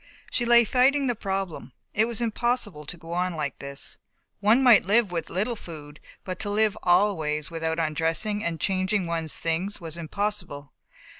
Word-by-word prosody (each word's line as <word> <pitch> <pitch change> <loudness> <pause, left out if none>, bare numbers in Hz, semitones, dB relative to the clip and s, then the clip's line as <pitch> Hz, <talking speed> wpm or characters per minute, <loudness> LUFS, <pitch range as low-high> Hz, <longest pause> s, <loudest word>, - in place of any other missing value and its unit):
She 240 - 0
lay 235 0 +7
fighting 265 +5 +3
the 245 - +1
problem. 195 - -4 0.2
It 215 - +3
was 235 0 -3
impossible 225 - -1
to 180 - -2
go 165 +1 -8
on 180 0 -1
like 145 -4 -3
this. 140 - -5 0.4
One 220 +6 +4
might 240 -5 +7
live 210 +1 +3
with 170 -2 -3
little 210 +7 -1
food, 150 -7 -10 0.2
but 185 -1 -5
to 205 - -2
live 210 0 +2
always 170 -5 +2
without 160 0 -2
undressing 165 +6 -1
and 165 -4 -2
changing 190 0 +1
one's 165 -2 -2
things 170 +5 -1
was 165 -2 -5
impossible. 170 -5 -4
185 Hz, 165 wpm, -26 LUFS, 160-215 Hz, 0.4 s, lay